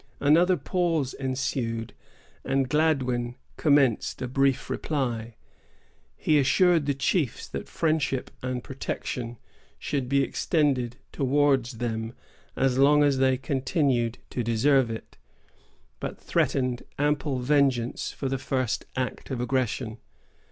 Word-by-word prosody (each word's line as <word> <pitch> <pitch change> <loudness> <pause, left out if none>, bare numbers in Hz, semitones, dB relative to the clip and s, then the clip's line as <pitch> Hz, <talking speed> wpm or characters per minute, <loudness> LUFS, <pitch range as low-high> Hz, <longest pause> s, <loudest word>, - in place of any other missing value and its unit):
Another 170 +6 +4
pause 165 -3 0
ensued, 125 -4 -2 0.5
and 135 0 +1
Gladwyn 125 -5 +1 0.2
commenced 140 -7 +2
a - - -2
brief 135 +1 +1
reply. 120 -6 -2 0.8
He 155 -1 +3
assured 160 +3 +3
the 140 - +1
chiefs 135 0 0
that - - -6
friendship 155 -5 0
and 125 -1 -3
protection 120 -2 -4 0.4
should 135 -4 -2
be 140 0 +3
extended 135 -7 0 0.2
towards 135 -2 +2
them 115 0 -3 0.4
as 130 -1 +1
long 145 +2 +6
as 140 -2 +2
they 130 -1 +3
continued 130 -3 0
to 125 - -2
deserve 120 +3 +3
it, 110 0 -7 0.8
but - - -5
threatened 125 -2 0 0.2
ample 145 -1 0
vengeance 130 -2 +1
for 135 - -4
the 135 0 -1
first 130 -2 -1
act 130 -1 -3
of 130 -3 -3
aggression. 120 -2 -1
135 Hz, 115 wpm, -26 LUFS, 125-145 Hz, 0.8 s, long